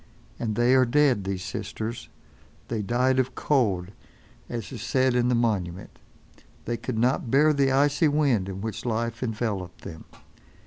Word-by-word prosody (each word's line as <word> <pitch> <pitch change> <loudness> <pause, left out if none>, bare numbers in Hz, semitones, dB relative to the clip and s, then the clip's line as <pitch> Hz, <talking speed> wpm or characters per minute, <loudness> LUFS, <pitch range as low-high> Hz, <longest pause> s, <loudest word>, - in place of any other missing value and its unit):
And 110 -3 -2
they 120 +3 +3
are 130 -1 +6
dead, 130 -5 +2
these 95 -1 -3
sisters. 110 +5 -5 0.6
They 115 -2 -1
died 125 +5 +1
of 130 0 -1
cold, 100 -10 +1 0.6
as 115 -4 -5
is - - -7
said 130 -1 +1
on 125 0 +2
the 125 - +2
monument. 95 -7 -2 0.7
They 120 - -1
could 115 0 -4
not 125 +1 +1
bear 150 +5 +4
the 140 -2 +2
icy 145 +3 +3
wind 140 -10 +1
in 95 0 -6
which 110 0 -5
life 115 0 -2
enveloped 110 -6 -3
them. 80 -1 -9
120 Hz, 155 wpm, -26 LUFS, 105-130 Hz, 0.7 s, are